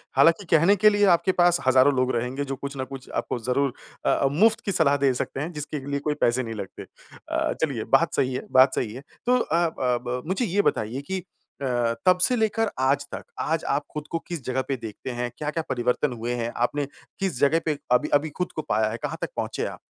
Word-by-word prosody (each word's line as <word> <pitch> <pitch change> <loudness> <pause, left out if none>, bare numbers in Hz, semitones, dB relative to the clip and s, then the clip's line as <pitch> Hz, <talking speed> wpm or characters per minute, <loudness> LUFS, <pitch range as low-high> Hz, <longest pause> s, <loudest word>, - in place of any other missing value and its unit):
हालाँकि 165 +4 +4
कहने 170 +6 +5
के 215 +2 +6
लिए 205 0 +3
आपके 185 - 0
पास 175 0 +5
हज़ारों 130 +2 +5
लोग 130 0 +1
रहेंगे 125 +4 -2
जो 135 - -3
कुछ 140 +1 -6
ना 130 - -1
कुछ 135 -1 -9
आपको - - -2
ज़रूर 125 +3 0 0.3
अ, 140 - +3
मुफ्त 215 +9 +4
की 200 - 0
सलाह 145 -5 +3
दे 135 -2 +2
सकते 125 - -3
हैं 155 +5 -3
जिसके 150 -2 -5
लिए 140 0 -1
कोई 150 +1 -1
पैसे 120 +2 +2
नहीं 115 -1 -5
लगते। 100 -3 -7 0.5
अ, - - 0
चलिए - - 0
बात - - -1
सही 130 -1 +1
है 130 - -4
बात 130 +1 +6
सही 110 -3 -2
है, 130 - -8 0.2
तो 250 +1 +4
अ 170 -5 +1
अ, 160 - -4 0.3
ब 125 0 -3
मुझे 190 +7 0
ये 200 +2 +2
बताइए 115 - -1
कि 190 - 0 0.4
अ, - - -2 0.4
तब 180 -1 +6
से 250 - +4
लेकर 220 -1 +1
आज 140 +2 +2
तक, - - -5 0.2
आज 160 +1 0
आप 145 +1 +1
खुद 150 0 -5
को 165 - -1
किस 170 -6 -5
जगह 130 +1 0
पे 135 - 0
देखते 115 +2 -7
हैं? 120 0 -3
क्या-क्या 155 +2 -2
परिवर्तन 125 +2 0
हुए 120 +1 -3
हैं? 120 0 -2
आपने 140 +4 0 0.3
किस 190 -10 -2
जगह 155 +4 +4
पे 155 -2 0
अभी, 125 0 +3
अभी 145 +2 +3
खुद 180 - -1
को 155 - -1
पाया 110 +1 +2
है? 115 - -4
कहाँ - - -3
तक - - -2
पहुँचे - - -2
आप? - - -6
140 Hz, 230 wpm, -25 LUFS, 125-165 Hz, 0.5 s, के